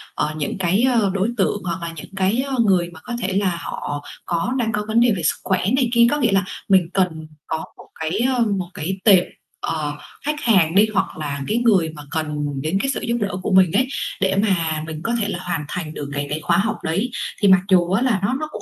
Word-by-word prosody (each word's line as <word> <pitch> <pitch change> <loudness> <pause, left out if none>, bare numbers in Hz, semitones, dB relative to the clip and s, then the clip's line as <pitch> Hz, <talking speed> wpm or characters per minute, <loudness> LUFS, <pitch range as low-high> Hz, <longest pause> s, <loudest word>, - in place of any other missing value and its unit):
ờ, 155 - -1
những 150 +5 -3
cái 190 +4 +1 0.2
ờ, 200 - +2
đối 195 +3 +1
tượng 205 +1 0
hoặc 175 0 -3
là 165 -1 -5
những 190 +5 -10
cái, 195 +6 +1
ờ, 270 - -2
người 180 -3 +2
mà 160 - -12
có 240 - -6
thể 190 - -1
là 185 -4 +1
họ 145 0 -5 0.2
có 175 +8 -1
đang 225 -2 0
có 210 -2 -2
vấn 225 +2 +2
đề 240 0 +5
về 165 - -4
sức - - +2
khỏe 185 -1 0
này 255 -3 +2
kia. 235 0 +6
Có 295 - +1
nghĩa 240 -7 +2
là 195 -1 +2 0.2
mình 185 -3 +4
cần 165 -5 0 0.2
có 160 - -1 0.2
một - - -14
cái, 160 +6 -1 0.2
ờ, - - -1 0.2
một 180 -1 -4
cái 190 +5 -3
tệp, 190 -5 +7 0.4
ờ, 150 -2 -2 0.3
khách 300 0 -1
hàng 185 -7 +3
đi, 210 +2 +6
hoặc 195 - -1
là 140 -2 -4
cái 220 - +1
người 200 -9 +3
mà 150 - -9
cần 150 -2 -2 0.2
đến 155 +6 0
cái 270 - -1
sự - - -3
giúp 235 0 -1
đỡ 200 - 0
của 195 - -2
mình 185 -2 +5
ấy, 255 +7 +2 0.3
để 190 0 +2
mà 170 -7 +1
mình 155 0 -6
có 230 - -1
thể 205 - 0
là 175 - -3
hoàn 165 -4 -3
thành 160 -3 -5
được 145 -2 -6
cái 145 0 -2
cái 150 - -2
khóa 170 +2 +2
học 215 +3 0
đấy. 190 +10 0 0.3
Thì 200 - +4
mặc 190 -1 +6
dù 180 -1 +4
á 195 - +2
là 240 -7 +2
nó 205 - +1
nó 310 - -3
cũng - - -7
185 Hz, 255 wpm, -21 LUFS, 160-210 Hz, 0.4 s, tệp